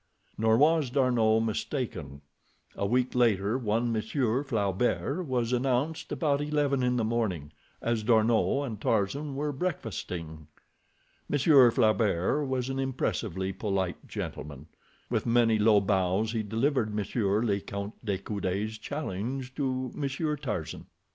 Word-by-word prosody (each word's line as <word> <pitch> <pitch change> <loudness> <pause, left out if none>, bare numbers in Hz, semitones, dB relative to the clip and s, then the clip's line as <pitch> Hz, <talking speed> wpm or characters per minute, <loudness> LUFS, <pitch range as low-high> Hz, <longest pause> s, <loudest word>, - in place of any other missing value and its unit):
Nor 110 0 +3
was 155 0 +4
D'Arnot 120 -4 +3
mistaken. 110 - -3 0.5
A 100 - -1
week 125 +3 +1
later 115 -1 +2
on 115 +3 +1
Monsieur 120 +3 0
Flaubert 125 - -1
was 125 -2 0
announced 130 +5 0
about 145 -3 +1
eleven 145 -2 +1
in 125 0 +1
the 115 - +1
morning, 105 -10 -1 0.3
as 115 -1 0
D'Arnot 115 +5 +3
and 110 -5 -6
Tarzan 135 +8 0
were 145 +2 -1
breakfasting. 90 - -4 0.8
Monsieur 140 -3 +6
Flaubert 110 - +2
was 130 -1 -1
an 135 0 -3
impressively 105 -8 -2
polite 95 -2 -2
gentleman. 75 -1 -6 0.5
With - - 0
many 115 -2 +3
low 105 -1 +5
bows 95 +2 +1
he 115 -1 -1
delivered 110 +1 0
Monsieur 105 0 0
le 100 -4 +1
Count 100 +1 -6
de 100 -4 -1
Coude's 100 +2 -3
challenge 130 0 -4
to 130 -3 -2
Monsieur 150 +2 -2
Tarzan. 125 - -5
115 Hz, 130 wpm, -28 LUFS, 100-135 Hz, 0.8 s, Monsieur